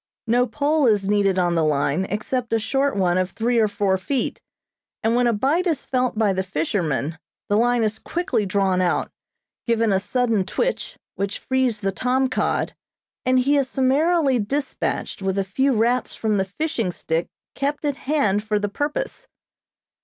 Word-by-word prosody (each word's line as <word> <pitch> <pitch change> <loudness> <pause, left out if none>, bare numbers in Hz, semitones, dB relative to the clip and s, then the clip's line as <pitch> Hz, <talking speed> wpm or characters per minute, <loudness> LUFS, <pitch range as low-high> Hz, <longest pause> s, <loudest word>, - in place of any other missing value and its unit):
No 245 +2 +2
pole 290 +3 +1
is 205 -3 +2
needed 200 -2 +2
on 175 -1 +2
the 165 -1 +2
line 150 +3 +1
except 230 +4 -2
a - - +4
short 270 +6 0
one 185 -2 +2
of 185 0 0
three 235 +3 0
or 220 - +4
four 200 -2 0
feet, 255 +7 -2 0.6
and 225 +1 +2
when 245 0 +3
a - - +4
bite 280 - +1
is 315 -5 -1
felt 255 -3 0
by 210 -3 +3
the 190 - 0
fisherman, 160 -3 -2 0.3
the 205 - +3
line 240 +1 +3
is 220 0 -1
quickly 345 -10 -1
drawn 190 -1 +1
out, 180 -1 0 0.6
given 230 -2 +2
a 190 - +3
sudden 230 -1 +1
twitch, 345 - -2 0.2
which 200 +1 -2
frees 260 -4 0
the 195 -1 0
tom 255 +5 +1
cod, 255 - -1 0.5
and 255 0 +4
he 285 +3 +3
is 270 -2 +1
summarily 275 +1 +2
dispatched 270 -1 -2
with 190 0 -1
a 195 - +2
few 265 +9 +1
raps 240 +2 +1
from 215 -2 0
the 190 - +1
fishing 230 - -2
stick 165 -1 -2 0.3
kept 290 +2 -2
at 285 -2 -1
hand 235 -9 +1
for 215 -1 0
the 205 0 -1
purpose. 300 - -3
225 Hz, 175 wpm, -22 LUFS, 195-265 Hz, 0.6 s, a